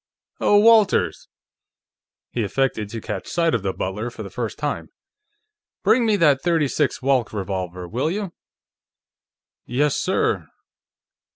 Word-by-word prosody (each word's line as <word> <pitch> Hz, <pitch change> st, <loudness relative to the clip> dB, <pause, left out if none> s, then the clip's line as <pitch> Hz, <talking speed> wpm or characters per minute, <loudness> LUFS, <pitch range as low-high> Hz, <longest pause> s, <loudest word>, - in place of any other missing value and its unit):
Oh, 205 Hz, -, +4 dB
Walters!" 220 Hz, -1 st, +4 dB, 1.0 s
He 120 Hz, -, -2 dB
affected 110 Hz, -1 st, -1 dB
to 115 Hz, +1 st, -5 dB
catch 100 Hz, -2 st, -5 dB
sight 170 Hz, -1 st, +1 dB
of 115 Hz, -, +1 dB
the 95 Hz, 0 st, -1 dB
butler 105 Hz, +6 st, -3 dB
for 115 Hz, -2 st, -8 dB
the 100 Hz, -, -9 dB
first 115 Hz, 0 st, -4 dB
time. 145 Hz, -1 st, -3 dB, 0.9 s
"Bring 235 Hz, 0 st, +4 dB
me 215 Hz, -, +3 dB
that 150 Hz, -8 st, +4 dB
.36 150 Hz, -6 st, 0 dB
Walch 130 Hz, -6 st, +2 dB
revolver, 95 Hz, -3 st, -4 dB
will 125 Hz, -, -1 dB
you?" 195 Hz, -1 st, -3 dB, 1.3 s
"Yes, 140 Hz, +4 st, +1 dB
sir." -, -, 0 dB
130 Hz, 125 wpm, -22 LUFS, 105-165 Hz, 1.3 s, Oh